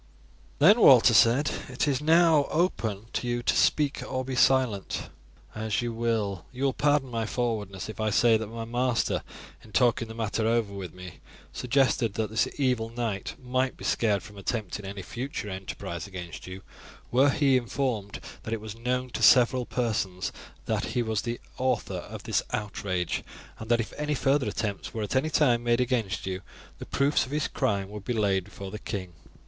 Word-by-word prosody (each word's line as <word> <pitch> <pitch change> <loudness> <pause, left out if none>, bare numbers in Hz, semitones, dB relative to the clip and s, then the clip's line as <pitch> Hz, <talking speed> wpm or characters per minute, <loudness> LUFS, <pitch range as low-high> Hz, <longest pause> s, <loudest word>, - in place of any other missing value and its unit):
"Then," 205 +10 +6
Walter 125 -2 +8
said, 115 +6 +5 0.2
"it 130 +3 -1
is 140 -2 +1
now 160 -1 +5
open 115 - -1
to 125 - -2
you 120 0 -1
to - - +2
speak 145 -2 +2
or 130 0 -3
be 130 0 -3
silent 125 -6 +2 0.4
as 110 +1 -1
you 120 -1 -2
will. 110 -5 -1
You 130 +1 -5
will 135 -1 +2
pardon 145 -2 +1
my 115 -2 -2
forwardness 105 -6 -2
if 110 - -8
I 110 - +1
say 115 +2 +4
that 110 -1 -1
my 115 +1 -6
master, 120 +1 0 0.4
in 110 - -15
talking 120 -2 +3
the 110 - -9
matter 110 0 -1
over 115 -3 +1
with 95 -4 -6
me, 90 0 -11 0.3
suggested 125 -4 +1
that 110 -1 -2
this 110 0 +2
evil 125 -5 +1
knight 115 -4 -3
might 130 +1 -1
be - - -11
scared 105 -4 +1
from 105 -2 -11
attempting 105 -1 -3
any 100 -1 -6
future 120 - -5
enterprise 95 -2 -6
against 90 -3 -8
you 95 +1 -8 0.5
were 135 +4 +5
he 135 -1 +3
informed 120 -4 -1 0.2
that 110 - -3
it - - -6
was 110 0 -8
known 125 +2 -2
to - - -4
several 125 0 +5
persons 100 -7 -1 0.3
that - - 0
he 120 - +3
was 110 -2 -1
the 120 0 -4 0.2
author 130 -5 0
of - - -9
this - - +1
outrage, 95 -4 -2 0.4
and 110 - -8
that 120 0 +4
if 115 - -3
any 150 0 -1
further 135 0 +2
attempts 100 -1 -4
were 110 - -2
at 105 - -3
any 140 +4 +2
time 125 -7 +3
made 120 0 +2
against 120 -6 0
you, 95 0 -3 0.4
the - - -8
proofs 140 -2 +2
of - - -11
his 150 0 0
crime 100 -2 -1
would 105 -1 -7
be 120 - -2
laid 100 -4 +1
before 100 0 -9
the 105 - -6
king." 95 -6 -5
115 Hz, 185 wpm, -27 LUFS, 105-130 Hz, 0.5 s, Walter